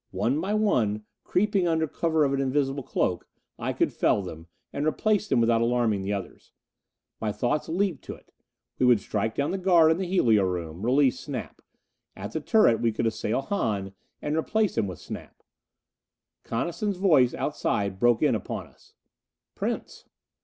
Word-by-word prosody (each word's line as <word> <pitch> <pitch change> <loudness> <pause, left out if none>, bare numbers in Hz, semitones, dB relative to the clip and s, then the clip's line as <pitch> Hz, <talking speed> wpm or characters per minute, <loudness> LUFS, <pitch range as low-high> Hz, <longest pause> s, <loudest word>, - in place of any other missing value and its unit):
One 120 +11 0
by 200 +4 -1
one, 110 - +1 0.2
creeping 195 -1 +1
under 160 -1 +1
cover 160 0 +1
of 140 - 0
an 135 - 0
invisible 135 +1 0
cloak, 90 -7 -1 0.3
I - - -2
could - - 0
fell 100 - +2
them, 80 -2 -9 0.3
and 145 +2 -1
replace 210 +5 +1
them - - +2
without 115 0 +3
alarming 115 -4 +1
the 95 +1 -3
others. 100 -2 -6 0.7
My 110 -1 -1
thoughts 120 +9 -1
leaped 180 -2 -1
to - - -6
it. - - -22 0.5
We 130 - +3
would 120 -3 +5
strike 110 +2 -2
down 140 +1 0
the 195 - -2
guard 175 -4 +5
in 160 - +1
the 190 -1 -3
helio 115 - +3
room. 85 -2 -4
Release 130 +2 +3
Snap. - - -7 0.5
At 100 +1 -7
the 160 - -3
turret 150 - +4
we 115 - +2
could 115 +2 -2
assail 110 +2 -1
Hahn, 105 - -2 0.3
and 150 +1 -1
replace 210 +6 0
him 110 -3 +1
with 90 -3 -6
Snap. - - -10 1.0
Coniston's 175 - -2
voice 155 -10 +4
outside 100 -2 -2
broke 120 0 +3
in - - +4
upon - - -4
us. - - -24 0.6
"Prince." - - -4
130 Hz, 170 wpm, -26 LUFS, 105-165 Hz, 1.0 s, would